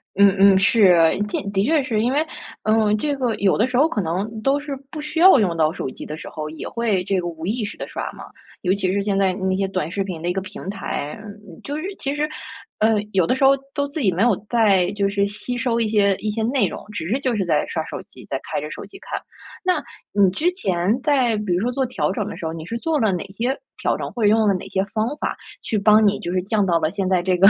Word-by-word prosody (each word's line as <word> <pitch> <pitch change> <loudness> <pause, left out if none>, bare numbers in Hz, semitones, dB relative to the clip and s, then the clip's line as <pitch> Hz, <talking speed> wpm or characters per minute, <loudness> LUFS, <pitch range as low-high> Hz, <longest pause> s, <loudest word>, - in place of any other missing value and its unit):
嗯 200 -1 +5
嗯， 195 -1 +7
是。 200 -3 +5 0.3
的 - - -2
的 195 0 +1
确 300 +3 +2
是， 225 -5 0
因 240 - +1
为， 300 +4 +1 0.4
呃， 215 -1 +3
这 285 +6 -1
个 245 -4 -1
有 200 -2 +2
的 225 +4 +3
时 250 - -1
候 295 +5 +5
可 210 - -2
能 200 +7 -3
都 275 +3 +2
是 285 -1 -5
不 305 -2 -6
需 300 +2 -4
要 365 -7 +8
用 180 -5 +1
到 155 -1 +2
手 135 - -4
机 - - -9
的 150 - -6
时 - - -9
候， 155 -1 -5
也 160 - -7
会 220 -6 0
这 195 -1 0
个 175 - -3
无 165 -1 -6
意 220 +3 -1
识 205 - -5
地 - - -5
刷 - - -5
嘛。 - - -11 0.4
尤 185 0 +2
其 190 -2 0
是 200 +1 0
现 200 -1 0
在 190 -2 +2
那 190 0 -1
些 195 0 0
短 185 -5 -2
视 195 +2 -1
频 175 -4 -6
的 175 - -3
一 175 - +1
个 190 - -2
平 185 - -9
台， 185 -6 -4
嗯， 205 -4 -12
就 290 +1 -4
是 310 - -5
其 275 +1 -2
实， 300 +1 0 0.5
呃， 220 +1 +4 0.2
有 185 -3 +3
的 255 - +1
时 270 - -1
候 270 - +8 0.2
都 285 -1 -1
自 290 +1 -4
己 195 - +3
没 180 +3 -1
有 235 -4 +4
在 200 -6 +3
就 200 -1 0
是 200 0 +1
吸 210 +4 -4
收 235 -1 0
一 225 - +1
些 200 -2 +3
一 215 - -3
些 220 +1 -2
内 255 +3 +2
容， - - -7
只 165 -6 -4
是 250 +8 0
就 255 -3 0
是 190 - 0
在 155 -3 +1
刷 - - -3
手 - - -6
机， - - -14
在 - - -1
开 - - -3
着 - - -6
手 - - -7
机 - - -13
看。 - - -5 0.5
那 365 -1 +1 0.3
你 200 -2 +4
之 330 - +1
前 195 - 0
在 260 -7 +3
比 210 -4 -1
如 180 - +1
说 245 +3 0
做 265 +1 0
调 175 -11 -1
整 200 +1 -2
的 - - -6
时 165 - -7
候， 160 - -2
你 160 -1 -7
是 230 +5 -4
做 315 0 0
了 215 -5 +2
哪 175 - -2
些 245 +7 -1 0.2
调 - - 0
整？ - - -5
或 235 - -3
者 - - +5
用 220 +1 +4
了 200 - +4
哪 185 - -4
些 190 - 0
方 220 +1 +1
法 - - -2 0.2
去 220 - -1
帮 210 +1 +5
你 205 0 +2
就 175 - -4
是 185 - +1
降 205 0 +1
到 170 -2 +2
了 155 - 0
现 195 -2 -2
在 185 -2 +3
这 185 -1 +1
个 195 +2 +7
205 Hz, 300 characters per minute, -22 LUFS, 185-240 Hz, 0.5 s, 要